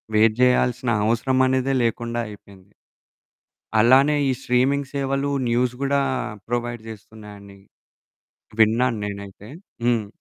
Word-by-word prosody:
Wait 110 0 +4
చేేయాల్సిన 125 0 +2 0.2
అవసరం 120 +4 +1
అనేదే 130 +1 0
లేకుండా 120 +1 -2
అయిపోయింది. 100 -2 -15 1.1
అలానే 135 +6 +5
ఈ - - +2
స్ట్రీమింగ్ 135 +3 +1
సేవలు 135 0 -1 0.2
న్యూస్ 120 +1 +1
గూడా 140 0 +1 0.5
ప్రొవైడ్ 120 -1 -3
చేస్తున్నాయండి. 105 -2 -13 1.0
విన్నాను 115 +2 +3
నేనైతే. 100 0 -8 0.4
హ్మ్. 120 -3 +1
120 Hz, 100 wpm, -22 LUFS, 110-130 Hz, 1.1 s, అలానే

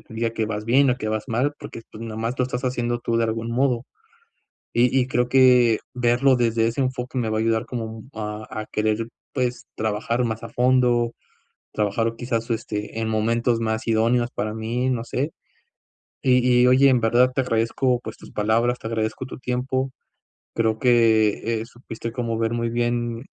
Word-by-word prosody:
te - - -15
diga 115 +1 0
que 115 - -1
vas 105 0 -4
bien 130 +4 +4
o 125 - +1
que 110 - -4
vas 110 0 -2
mal, 125 +6 +1
porque, 115 - -9
pues, 110 - -9
nomás 115 +2 -3
lo 125 - +3
estás 125 0 -4
haciendo 120 -1 -1
tú 115 -1 -1
de 115 - +2
algún 115 +1 -2
modo. 125 -1 +1 0.9
Y 125 +2 +3
y 125 - +2
creo 125 -1 0
que 125 -3 +5 0.2
verlo 125 +2 +3
desde 115 -2 +2
ese 115 +4 -1
enfoque 130 0 -3
me 115 -2 -1
va 110 - 0
a - - +1
ayudar 115 +1 +1
como 110 -2 -5
a 105 0 -5
a 110 0 -5
querer, 110 +1 0 0.3
pues 125 -2 -2
trabajar 110 +3 -1
más 110 -1 -3
a - - -6
fondo, 125 -2 +2 0.6
trabajar 105 +2 0
o 115 - -6
quizás, 115 -1 -3
este, 110 -1 -3
en 110 - -1
momentos 115 +2 +1
más 110 0 -2
idóneos 115 +2 +2
para 105 +1 -2
mí, 120 +4 -1
no 120 -2 -1
sé. 135 +5 -2 0.9
Y 130 -2 +4 0.3
y - - +6
oye, 130 +2 +6
en 125 -2 +3
verdad, 120 +3 +4
te - - +2
agradezco 120 +1 +1
pues 110 -2 -8
tus - - -13
palabras, 115 +4 +1
te 110 - -6
agradezco 110 +2 -2
tu - - -9
tiempo. 130 +1 -2 0.6
Creo 110 -1 +1
que, 115 -2 +3
eh, 115 - -6
supiste 115 -1 -8
como 115 -2 -2
ver 115 0 0
muy 115 0 -1
bien 120 0 -1
115 Hz, 190 wpm, -23 LUFS, 110-125 Hz, 0.9 s, y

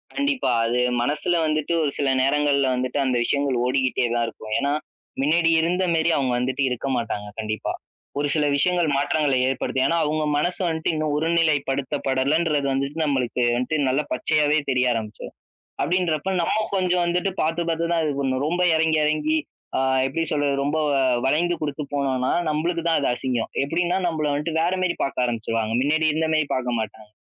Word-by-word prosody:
கண்டிப்பா. 280 - 0
அது 120 +2 0 0.2
மனசுல 150 +7 0
வந்துட்டு 155 +1 -1
ஒரு 145 - 0
சில 140 -2 +1
நேரங்கள்ல 140 0 +2
வந்துட்டு 125 +2 -2
அந்த 130 -1 +1
விஷயங்கள் 140 0 0
ஓடிக்கிட்டே 130 0 +1
தான் 120 0 +1
இருக்கும். 110 -1 -7
ஏன்னா, 140 0 0 0.5
மின்னாடி 165 +4 +3
இருந்த 180 +3 0
மெரி 160 +1 +2
அவுங்க 130 -3 0
வந்துட்டு 130 +3 -1
இருக்க 125 +2 -3
மாட்டாங்க 105 -3 -3
கண்டிப்பா. 110 0 -3 0.5
ஒரு 145 - +1
சில 150 -1 +2
விஷயங்கள் 175 +2 +2
மாற்றங்களை 145 -1 +1
ஏற்படுத்தும். 130 0 -1
ஏன்னா, 170 - +1
அவுங்க 155 +1 0
மனசு 175 +4 -1
வன்ட்டு 160 0 -1
இன்னும் 155 -1 -1
ஒருநிலைப்படுத்தப்படலன்றது 145 -1 +1
வந்துட்டு 140 +3 -2
நம்மளுக்கு 125 -4 0
வன்ட்டு 125 +5 -1
நல்ல 135 +3 +1
பச்சையாவே 150 +4 +2
தெரிய 125 -1 +2
ஆரம்பிச்சரும். 110 -2 -6 0.5
அப்டின்றப்ப 180 0 0
நம்ம 170 - 0 0.2
கொஞ்சம் 180 -2 +1
வந்துட்டு 180 +3 0
பாத்து, 165 +2 0
பாத்து 165 +1 -1
தான் 165 -1 +1
இது 150 - 0
பண்ணும். 130 -1 0
ரொம்ப 175 +3 -1 0.2
எறங்கி, 160 -1 +2
எறங்கி 155 +1 +1 0.4
ஆ - - +2 0.3
எப்டி 155 +5 -2
சொல்றது 145 -2 +1
ரொம்ப 145 +3 -1
வ - - +1 0.3
வளைந்து 170 +6 +2
குடுத்து 150 0 -3
போனோனா, 130 -2 0 0.2
நம்பளுக்கு 165 +2 -1
தான் 165 -2 +3
அது 140 - 0
அசிங்கம். 125 -2 -2
எப்டின்னா 175 +5 0
நம்பள 155 -3 -1
வன்ட்டு 150 +3 -2
வேற 175 +3 +1
மெரி 180 -2 0
பாக்க 135 -2 -1
ஆரம்பிச்சுருவாங்க. 115 -1 -2
மின்னாடி 155 +3 +1
இருந்த 160 +1 0
மெரி 155 -1 +2
பாக்க 125 -1 -1
மாட்டாங்க. 110 0 -6
145 Hz, 165 wpm, -23 LUFS, 130-160 Hz, 0.5 s, மின்னாடி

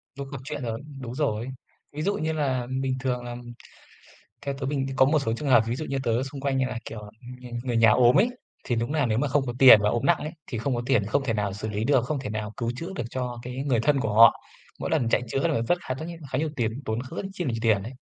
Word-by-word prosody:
Lúc 140 0 -6
gặp 135 - -5
chuyện 145 +1 -5
rồi 115 -1 -3 0.2
đúng 120 -2 -6
rồi. 120 -6 -1 0.5
Ví 150 - -3
dụ 200 +5 +1
như 160 -4 -1
là 130 -5 -1
bình 130 -1 -1
thường 125 -1 -2
là 120 0 -6 1.1
theo 140 - -1
tớ 135 - -3
bình 135 -1 -1
có 130 - +6
một 155 +2 +3
số 135 -6 -1
trường 145 +3 -3
hợp 120 -4 +6
ví 115 +2 -1
dụ 155 - -4
như 135 - -3
tớ 115 +1 +1
xung 135 +1 -6
quanh 135 -1 0
như 130 - +2
là, 125 -2 -4
kiểu, 110 - -7 0.4
người 125 -1 -10
người 120 -2 -1
nhà 115 -1 +6
ốm 120 +2 +5
ấy, 230 +6 +5 0.4
thì 120 - -1
đúng 115 +4 -1
nà 150 -5 +2
nếu 110 -1 +1
mà 145 +2 +1
không 135 0 +1
có 120 - -2
tiền 130 -6 +10
và 105 - +3
ốm 120 - -1
nặng 175 - +5
ấy, 150 - -5 0.2
thì 120 - -4
không 130 +4 -1
có 120 - -2
tiền, 125 -6 +3
không 140 +7 +1
thể 125 - 0
nào 105 -2 -1
xử 105 +2 -5
lý 105 +1 -2
được, 130 -2 +3
không 145 +3 -2
thể 130 - -5
nào 110 0 -4
cứu 115 -1 -1
chữa 165 +5 -5
được 120 - -2
cho 125 -2 -4
cái 125 +1 -6
người 125 -5 +2
thân 140 +2 +2
của 110 -4 -1
họ. 115 +2 +7 0.4
Mỗi - - -3
lần 115 - +1
chạy 115 - +2
chữa 135 +7 0
là 145 -7 +1
rất 175 +9 +1
khá 130 - 0
rất 155 +5 -6
nh 170 - -7 0.2
khá 130 - +1
nhiều 155 +1 -1
tiền, 115 +1 -1
tốn 110 +1 -2
rất 130 +6 -8
rất - - -3
chi 180 -2 -4
là 135 - 0
nhiều 115 - -2
tiền 110 -4 +3
đấy. 115 +6 -7
130 Hz, 295 wpm, -26 LUFS, 115-140 Hz, 1.1 s, tiền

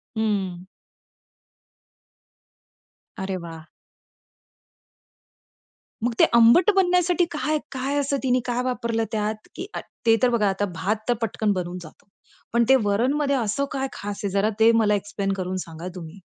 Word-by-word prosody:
हं. 195 -5 -2 2.5
अरे 190 -1 -3
वाह! 165 -1 -10 2.4
मग 240 - +1
ते - - +7
आंबट 235 - +6
बनण्यासाठी 360 -1 +3
काय 305 0 0
काय 270 +2 -2
असं 280 0 0
तिने 255 -1 +2
काय 245 0 -1
वापरलं 235 -3 -1
त्यात? 215 0 -1 0.2
की 370 - -6
अ, - - -3 0.3
ते 225 -1 +6
तर 250 - +5
बघा 215 -4 +2
आता 195 +1 -1
भात 200 +7 0
तर - - +5
पटकन 215 -1 0
बनून 180 -1 -4
जातो. 155 +3 -14 0.5
पण 235 0 +4
ते 265 - +8
वरणमध्ये 270 +8 +1
असं 255 +3 0
काय 270 -1 -2
खास 205 0 -6
आहे? 200 - -1
जरा 200 +2 +2
ते 225 +1 +7
मला 220 -2 +3
एक्सप्लेन 200 0 -3
करून 185 -1 -3
सांगा 165 +2 -8
तुम्ही? 170 +1 -9
220 Hz, 145 wpm, -24 LUFS, 195-260 Hz, 2.5 s, ते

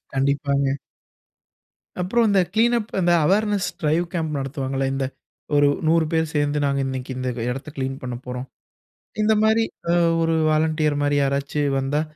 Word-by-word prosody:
கண்டிப்பாங்க. 140 0 +1 1.3
அப்புறம் 225 +6 +2
இந்த 200 -2 +4
கிளீனப் 230 0 +2
அந்த 175 -1 +3
அவேர்னஸ் 205 +2 +2
டிரைவ் 160 +2 +1
கேம்ப் 160 -4 -2
நடத்துவாங்கல்ல 135 0 -2
இந்த 135 0 -1 0.5
ஒரு 145 0 +5 0.2
100 165 0 +4
பேர் 160 0 +2
சேர்ந்து 145 0 +1
நாங்க 140 0 +1
இன்னக்கி 130 0 -4
இந்த 130 0 -2 0.2
இடத்த 135 +4 -5
கிளீன் 135 0 -3
பண்ணப்போறோம். 125 0 -6 0.8
இந்த 215 +1 +4
மாரி 220 +1 +4 0.3
அ - - +3 0.3
ஒரு 165 0 +2 0.2
வாலண்டியர் 155 -1 +1
மாரி 145 0 +2
யாராச்சு 140 +2 -1 0.2
வந்தா, 140 +3 0
145 Hz, 140 wpm, -22 LUFS, 135-170 Hz, 1.3 s, ஒரு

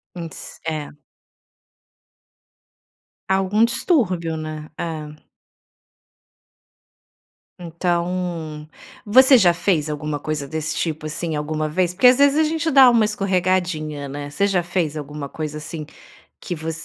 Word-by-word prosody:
Hum, 170 -2 -6
si - - -11
é. 155 -2 -4 2.3
Algum 195 +4 +3
distúrbio, 195 - 0
né? 155 -1 -6
É. 155 -2 -6 2.3
Então, 170 -2 -3 0.4
você 260 +5 +7
já 175 -5 +5
fez 165 -4 0
alguma 150 0 -3
coisa 150 -1 -3
desse 155 +1 -4
tipo, 155 -2 -3
assim, 155 +1 -3
alguma 155 +1 -2
vez? 180 +2 0
Porque 225 +7 +5
às 250 +1 +6
vezes 285 +1 +4
a 315 - +4
gente 320 +1 0
dá 265 -3 +8
uma 230 -3 +4
escorregadinha, 180 -7 -1
né? 145 +1 -6
Você 200 +8 0
já 190 -3 +1
fez 170 -3 -2
alguma 145 -1 -6
coisa 150 -1 -5
assim 155 0 -6 0.5
que 175 - -5
voc 160 +1 -5
165 Hz, 125 wpm, -21 LUFS, 155-195 Hz, 2.3 s, dá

